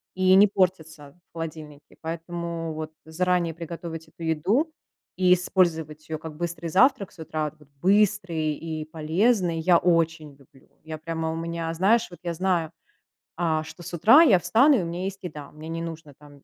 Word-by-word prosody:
и 185 0 +4
не 205 +2 +7
портится 160 -5 -2
в - - -64
холодильнике, 155 -3 -8
поэтому 165 0 -5
вот 155 0 -6
заранее 175 0 0
приготовить 165 -1 -7
эту 165 - -12
еду 190 - +1 0.5
и 180 -1 +5
использовать 160 -4 0
её 155 -1 -3
как 155 -1 -8
быстрый 170 0 -4
завтрак 245 - +3
с - - -21
утра, 155 -1 -3
да, 150 -1 -21 0.2
быстрый 185 -6 +2
и 155 0 -5
полезный, 165 +3 +1
я 170 +1 +4
очень 165 -4 0
люблю. 135 -1 -23
Я 155 0 -6
прямо 160 0 -3
у - - -4
меня, 165 0 -3
знаешь, 210 +7 +3
вот 175 - -12
я 170 -1 -2
знаю, 175 -3 0 0.6
а, 160 -2 0
что 165 +2 -11
с - - -8
утра 225 - +7
я 215 - +6
встану 250 - +4
и - - -1
у - - -3
меня 175 +3 -4
есть 195 0 -6
еда, 150 -5 -8
мне 155 +1 -10
не 165 0 -4
нужно 160 -3 -7
там 145 0 -18
165 Hz, 180 wpm, -25 LUFS, 155-180 Hz, 0.6 s, не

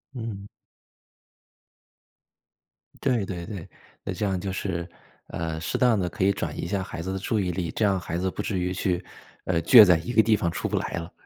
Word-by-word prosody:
嗯。 110 -4 -5 2.6
对 115 -6 +2
对 85 -3 -5
对， 100 -6 -7 0.4
那 - - -2
这 105 - -2
样 95 -2 0
就 95 +1 -4
是， 85 -2 -3 0.4
呃， 80 -1 -4
适 - - -2
当 120 -5 +4
地 90 - 0
可 90 - -3
以 100 - +5
转 - - -4
移 - - -3
一 85 - -3
下 100 0 -1
孩 85 -3 -6
子 95 +3 -4
的 95 - -3
注 110 +2 -1
意 90 -3 0
力， 85 -2 -3
这 110 - -1
样 100 -2 +3
孩 85 -1 -4
子 95 +1 -1
不 - - -4
至 100 -2 -2
于 90 +1 -1
去 90 -1 -1 0.4
呃， 85 -3 0
倔 115 +2 +10
在 90 -4 +5
一 120 +9 -5
个 110 -1 +6
地 110 -1 +3
方 85 - 0
出 - - -3
不 - - 0
来 - - -2
了。 85 +1 -5
95 Hz, 235 characters per minute, -26 LUFS, 85-105 Hz, 2.6 s, 倔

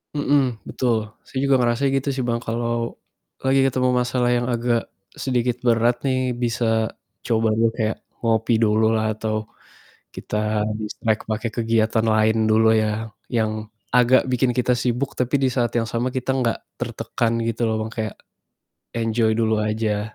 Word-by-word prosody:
Mhm, 140 -5 +1
betul. 110 -4 0 0.2
Saya 130 - -4
juga 140 -1 +4
ngerasa 120 +2 +1
gitu 135 +1 -1
sih 130 - -1
Bang, 120 -1 0
kalau 115 0 -2 0.5
lagi 135 +1 +3
ketemu 130 -1 +1
masalah 125 0 +1
yang 120 0 +1
agak 120 -1 0 0.4
sedikit 125 -2 0
berat 120 +1 +3
nih, 130 -1 +1
bisa 115 -2 0 0.4
coba 115 -1 +2
dulu 115 +1 +3
kayak, 110 -2 -1 0.2
ngopi 115 0 +1
dulu 110 0 +3
lah 110 0 0
atau 110 0 -3 0.7
kita - - -5 0.4
distract 110 0 -2
pakai 110 +2 -1
kegiatan 115 -1 +1
lain 110 0 +3
dulu 110 +1 +5
yang 110 +1 0 0.2
yang 110 -2 +1 0.4
agak 125 +1 +5
bikin 125 0 +2
kita 125 0 +1
sibuk, 125 +3 -1
tapi 125 +3 0
di 135 - +2
saat 120 -3 +1
yang 115 - 0
sama 120 +3 -1
kita 130 +1 -1
nggak 125 -4 0 0.2
tertekan 115 -1 -2
gitu 115 +1 -2
loh 110 -1 +1
Bang, - - -7
kayak 110 -3 -3 0.8
enjoy 115 0 +1
dulu 110 -1 +2
aja. 105 0 -1
115 Hz, 155 wpm, -22 LUFS, 110-125 Hz, 0.8 s, dulu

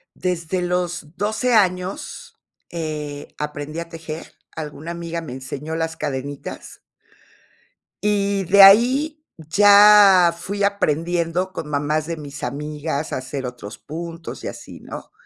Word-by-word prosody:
Desde 180 0 -2
los 175 -3 -2
12 220 +4 0
años, 185 -3 -1 0.3
eh, 150 -3 -5
aprendí 150 +1 -5
a 170 - -5
tejer, 160 -1 -8 0.2
alguna 155 +1 -6
amiga 170 0 -5
me 155 - -8
enseñó 135 +5 -6
las 165 0 -2
cadenitas. 140 -1 -6 1.2
Y, 200 -1 +1
de 195 +3 +7
ahí, 260 +10 +5
ya 200 +1 +7
fui 200 +4 -4
aprendiendo 175 -1 0
con 150 - -6
mamás 150 +1 -1
de 170 -1 -4
mis 145 -2 -9
amigas 150 +3 -4
a - - 0
hacer 130 +1 -5
otros 125 -3 -8
puntos, 165 +2 -8
y - - -4
así, - - -9
¿no? - - -9
165 Hz, 125 wpm, -21 LUFS, 150-190 Hz, 1.2 s, de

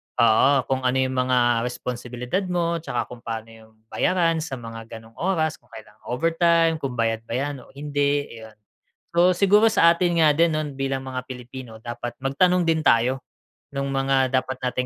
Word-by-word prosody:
Oo, 115 +3 +5 0.2
kung 130 -1 -1
ano 125 - +1
yung 130 0 -1
mga 120 -2 +3
responsibilidad 125 +4 -4
mo' 170 -2 0
tsaka 120 -7 -3
kung 125 - -9
paano 115 -1 -5
yung 110 0 -17 0.2
bayaran 170 -3 +1
sa 150 - -7
mga 115 -2 -9
ganong 115 +1 -14
oras, 160 -4 0
kung - - -30
kailan 110 -1 -12
overtime, 165 +3 +2
kung 135 -4 -4
bayad 115 -1 0
ba - - -5
'yan 140 +1 -2
o - - -20
hindi, 145 0 -1
ayon. 110 -1 -12 0.6
Oo, 175 +1 +6
siguro 205 +4 +4
sa 170 -6 +5
atin 175 0 0
nga 155 -2 +5
din, 170 0 +4
'no, 155 0 -1
bilang 135 0 -3
mga 130 -1 -4
Pilipino 125 -2 -9
dapat 120 +1 -6
magtanong 180 +7 +2
din 165 -1 +2
tayo 125 +3 +3 0.5
nung 140 0 -2
mga 135 -1 +2
dapat 130 0 0
nating 125 0 -1
135 Hz, 180 wpm, -23 LUFS, 120-165 Hz, 0.6 s, Oo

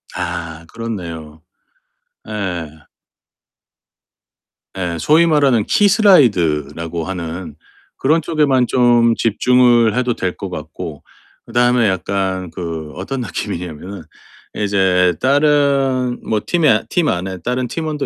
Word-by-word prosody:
아 80 -1 -5
그렇네요. 85 -9 -7 0.9
예. 90 -7 -4 2.1
예 85 -3 -3
소위 160 - +4
말하는 140 -9 +3
키 205 -1 +3
슬라이드라고 85 - +2
하는 85 -3 -6 0.4
그런 155 +5 +2
쪽에만 145 -6 +1
좀 120 -2 +3
집중을 120 0 +3
해도 125 -1 +1
될 95 -1 -3
것 100 - -6
같고. 80 -2 -8 0.4
그 - - -14
다음에 120 -2 +3
약간 95 -1 -2
그 80 -4 -6
어떤 125 +9 -5
느낌이냐면은 90 -4 -6 0.5
이제 95 -3 +2
다른 140 -3 +2
뭐 110 - -1
팀에 150 -11 +2
팀 170 -3 +1
안에 95 +1 -3
다른 125 +6 -2
팀원도 150 +1 -3
105 Hz, 220 characters per minute, -17 LUFS, 85-130 Hz, 2.1 s, 소위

